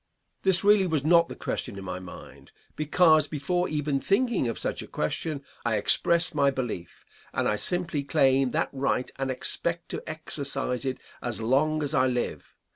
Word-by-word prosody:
This 190 -1 +2
really 205 -2 +5
was 155 -5 0
not 170 +1 +5
the - - -8
question - - -4
in 95 - -7
my 90 -1 -5
mind, 90 -1 -12 0.2
because, 155 0 +4
before 175 +5 -1
even 150 -2 -1
thinking 225 - +1
of 115 - -3
such - - -3
a - - -9
question, 140 - -2 0.2
I 120 -2 +1
expressed 170 - +3
my 140 -2 +3
belief, 120 -10 -5 0.3
and - - 0
I 105 - +2
simply 170 - -1
claim 135 -3 +3
that - - 0
right 135 -2 -1
and 135 0 -2
expect 170 +6 -1
to - - -4
exercise 140 -4 -3
it 130 -1 -2 0.2
as 120 -3 -3
long 150 +7 +1
as 145 +1 -3
I 130 - +3
live. 125 -1 -3
145 Hz, 175 wpm, -27 LUFS, 130-170 Hz, 0.3 s, really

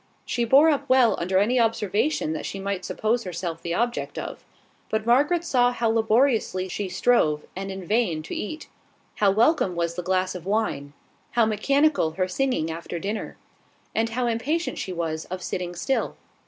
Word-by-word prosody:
She 240 -1 -1
bore 275 +7 +6
up 285 -2 -2
well 255 -3 +5
under 185 +2 0
any 230 +6 +3
observation 225 - +1
that 155 - -4
she 195 - -5
might 195 -1 -3
suppose 230 +5 -1
herself 170 -2 -5
the 170 0 -2
object 240 +3 -2
of; - - -6 0.5
but 220 0 -1
Margaret 290 +9 +3
saw 245 -7 +3
how 235 -2 0
laboriously 220 -4 +2
she 195 +1 -3
strove, 180 -7 +2
and 195 +1 -4
in 190 -1 -7
vain, 175 -6 +1
to - - -7
eat; 310 +9 -5 0.5
how 205 - +4
welcome 215 - +3
was 170 0 -1
the 180 - -4
glass 185 +1 0
of 180 -1 -8
wine; 195 -10 -1 0.4
how 235 -1 +4
mechanical 275 - +2
her 185 +2 0
singing 185 -5 -1
after 170 +1 -5
dinner; 205 +5 -4 0.6
and 225 +1 +1
how 245 +2 -1
impatient 275 +9 -1
she 190 - -4
was 165 -2 -3
of 185 0 -6
sitting 175 -1 -4
still. 260 +10 -1
210 Hz, 175 wpm, -25 LUFS, 180-245 Hz, 0.6 s, bore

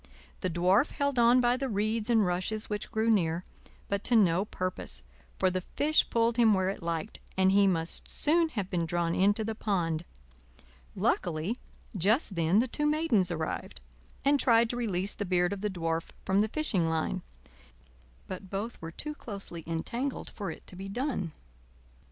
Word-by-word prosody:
The 185 - -1
Dwarf 185 - +3
held 280 -3 -1
on 240 +2 +6
by 245 0 +3
the 270 0 -2
reeds 215 +2 -1
and 225 -3 +4
rushes 185 +5 -2
which 210 0 -3
grew 225 +1 +2
near; 170 -4 +1 0.4
but 200 0 -2
to 245 - +3
no 190 -3 +4
purpose, 185 - -4 0.3
for 185 -1 +2
the 185 0 -1
fish 300 - +2
pulled 230 0 +2
him 225 -3 +5
where 190 0 +1
it 195 - -4
liked, 170 +4 -3 0.2
and 190 0 +4
he 200 0 +5
must 165 -3 -1
soon 330 +2 +2
have 205 -10 -3
been 170 -3 0
drawn 170 0 0
into 205 +4 +3
the 225 +1 -2
pond. 175 -7 -1 0.9
Luckily 170 +6 0 0.4
just 205 - +2
then 170 +2 +2
the 240 +4 +4
two 295 +5 -1
Maidens 300 - +3
arrived, 160 -2 -4 0.5
and 285 0 +4
tried 230 -2 +4
to - - -4
release 200 -5 -1
the - - -4
beard 180 0 +1
of 200 - -6
the 210 - 0
Dwarf 165 -3 -2 0.2
from 190 +1 +3
the 215 - +2
fishing 210 - +1
line; 160 - -1 1.1
but 185 0 -7
both 205 +5 -4
were 165 - -5
too 300 - -4
closely 200 - -6
entangled 235 +12 -3
for 200 -3 -5
it - - -9
to - - -11
be 195 +2 -7
done. 240 - -2
200 Hz, 175 wpm, -30 LUFS, 175-230 Hz, 1.1 s, on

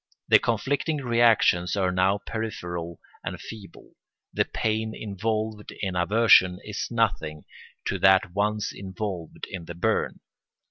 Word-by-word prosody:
The - - +8
conflicting 140 +7 0
reactions 115 -7 +3
are 95 -2 +1
now 95 +2 +2
peripheral 90 -7 -5 0.2
and - - -5
feeble; 105 -4 -11 0.4
the - - +2
pain 110 0 -2
involved 110 +1 -3
in 95 -2 -2
aversion 95 0 +5
is 105 -2 -4
nothing 100 -10 -1 0.4
to - - -1
that 95 -1 +4
once 105 +1 0
involved 95 -3 -6
in 90 -3 -6
the 85 - -8
burn. 85 - 0
100 Hz, 125 wpm, -26 LUFS, 90-110 Hz, 0.4 s, The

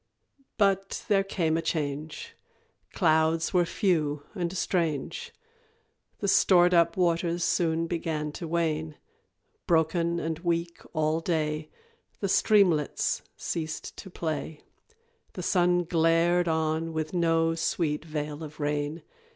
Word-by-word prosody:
But 195 -2 +1
there 195 -2 +4
came 165 -5 0
a - - 0
change, 155 -1 -4 0.6
Clouds 160 +1 +2
were 175 -2 +3
few 155 -8 0
and 175 -4 -2
strange 170 - -1 0.9
The 200 - -1
stored 180 -2 +5
up 170 +1 +3
waters 170 -1 +1
soon 165 -1 +1
began 160 -3 -2
to 165 +3 -6
wane; 160 -2 -1 0.7
Broken 170 0 +2
and 160 -1 -3
weak 170 -1 -2
all 155 0 +1
day, 155 -2 -1 0.5
The 200 - -2
streamlets 185 -8 +3 0.2
ceased 160 -2 -4
to 190 - -9
play, 160 -3 -4 0.7
The - - -6
sun 175 -1 +2
glared 170 +1 +2
on 160 0 0
with 155 +1 -3
no 165 -2 +2
sweet 160 -2 -1
veil 150 -1 -5
of 155 0 -10
rain. 145 +2 -2
165 Hz, 120 wpm, -27 LUFS, 155-175 Hz, 0.9 s, stored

